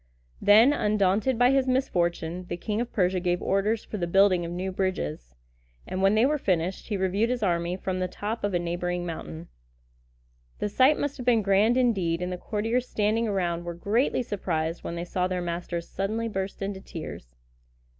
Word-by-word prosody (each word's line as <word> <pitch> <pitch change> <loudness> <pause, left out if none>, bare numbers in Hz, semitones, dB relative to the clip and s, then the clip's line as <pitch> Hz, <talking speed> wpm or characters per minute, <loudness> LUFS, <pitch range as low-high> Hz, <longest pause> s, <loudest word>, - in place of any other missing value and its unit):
Then, 220 +7 +7
undaunted 210 +1 +1
by 245 +2 +5
his 270 -1 +2
misfortune, 180 -9 0
the 175 - -3
King 210 +4 -2
of 240 - -4
Persia 185 -2 +1
gave 175 0 0
orders 210 +5 0
for 215 - -5
the 175 -3 -2
building 190 0 +4
of 170 - -5
new 185 +2 -3
bridges; 75 - -3 0.5
and 185 - -4
when 195 +2 +4
they 220 +3 +4
were 300 +2 +1
finished, 180 -4 -1
he 210 - -1
reviewed 195 +4 +1
his 250 -3 -1
army 175 -1 0
from 185 -1 -3
the 185 - 0
top 210 +5 -5
of 205 -2 0
a - - +4
neighboring 175 +1 -2
mountain. 165 0 -6 1.1
The 210 - -2
sight 260 +8 +4
must 285 -1 -2
have 250 - -7
been 230 -3 +4
grand 205 +5 +3
indeed, 195 -10 +1
and 180 +1 -3
the 180 - -3
courtiers 225 +6 -1
standing 220 +2 +1
around 175 -4 -1
were 175 0 -5
greatly 225 +8 +1
surprised 170 -7 -2
when 170 - -4
they 170 +1 -4
saw 180 +1 -1
their 185 -1 -2
master 175 0 -3
suddenly 215 +6 -3
burst 195 -2 -4
into 195 -1 -4
tears. - - -8
190 Hz, 190 wpm, -26 LUFS, 175-220 Hz, 1.1 s, Then